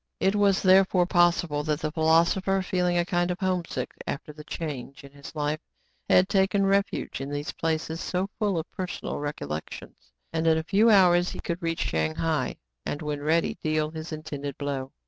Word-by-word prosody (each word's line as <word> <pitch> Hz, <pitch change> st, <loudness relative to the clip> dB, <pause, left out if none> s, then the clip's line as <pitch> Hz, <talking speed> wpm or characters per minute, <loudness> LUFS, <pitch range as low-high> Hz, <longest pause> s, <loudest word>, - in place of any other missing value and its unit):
It 195 Hz, -, +2 dB
was 200 Hz, -2 st, +3 dB
therefore 185 Hz, -1 st, +5 dB
possible 175 Hz, -4 st, +2 dB
that 150 Hz, -1 st, 0 dB
the 155 Hz, -, -2 dB
philosopher, 170 Hz, +4 st, +2 dB
feeling 180 Hz, -2 st, +1 dB
a 175 Hz, -, +2 dB
kind 175 Hz, 0 st, 0 dB
of 180 Hz, -, -1 dB
homesickness 185 Hz, -3 st, -2 dB
after 150 Hz, +2 st, -5 dB
the 150 Hz, 0 st, -11 dB
change 145 Hz, -4 st, -6 dB
in 140 Hz, -, -12 dB
his 140 Hz, +2 st, -12 dB
life, 150 Hz, 0 st, -1 dB, 0.5 s
had 185 Hz, -, +5 dB
taken 195 Hz, 0 st, +2 dB
refuge 195 Hz, -6 st, 0 dB
in 135 Hz, -, -4 dB
these 145 Hz, +1 st, -3 dB
places 160 Hz, 0 st, -2 dB
so 185 Hz, +1 st, -1 dB
full 205 Hz, -5 st, +1 dB
of 160 Hz, -, -2 dB
personal 185 Hz, -3 st, -4 dB
recollections; 145 Hz, -, -6 dB, 0.2 s
and 160 Hz, 0 st, 0 dB
in 160 Hz, -1 st, +5 dB
a 160 Hz, -, -1 dB
few 205 Hz, +7 st, +4 dB
hours 180 Hz, -4 st, +5 dB
he -, -, -7 dB
could 170 Hz, +1 st, -4 dB
reach 165 Hz, -1 st, -2 dB
Shang 80 Hz, 0 st, 0 dB
hai, 160 Hz, -5 st, -1 dB, 0.3 s
and, 145 Hz, -, -4 dB
when 150 Hz, -1 st, -3 dB
ready, 160 Hz, +3 st, +1 dB
deal 155 Hz, 0 st, 0 dB
his 160 Hz, +1 st, -7 dB
intended, 145 Hz, -3 st, -5 dB
blow. 140 Hz, -2 st, -3 dB
165 Hz, 185 wpm, -26 LUFS, 150-185 Hz, 0.5 s, therefore